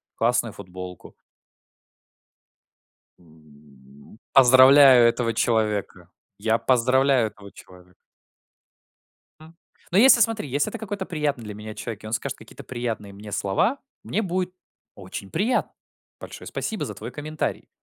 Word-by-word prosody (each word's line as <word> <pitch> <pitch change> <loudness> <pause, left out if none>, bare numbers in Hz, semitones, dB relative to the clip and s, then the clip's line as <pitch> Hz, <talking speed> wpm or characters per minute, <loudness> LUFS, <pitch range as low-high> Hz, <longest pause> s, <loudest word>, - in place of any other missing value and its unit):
классную 120 -1 0
футболку. 90 -2 -10 2.0
М, 75 - -20
поздравляю 130 -1 +7
этого 115 -1 -1
человека. 105 -6 -1 0.3
Я 110 +2 +1
поздравляю 130 -1 +2
этого 100 -1 -15
человека. 90 0 -17 1.5
М, 160 +1 -15 0.4
но 185 - +2
если, 245 0 +7
смотри, 220 -8 +1
если 140 +3 -1
это 230 - -7
какой-то 205 -3 -5
приятный 145 -7 -2
для 105 -1 -7
меня 105 +1 -9
человек, 110 -1 -7
и - - -7
он 110 - -8
скажет 115 - -3
какие-то - - -13
приятные 115 -5 -5
мне 105 +1 -11
слова, 175 - 0 0.2
мне 220 - -2
будет 180 -1 -2 0.4
очень 95 0 -9
приятно: 220 +9 0 0.5
большое - - -10
спасибо 220 - -4
за 105 - -6
твой 110 +4 -8
комментарий. 155 +2 -5
115 Hz, 125 wpm, -24 LUFS, 100-145 Hz, 2.0 s, поздравляю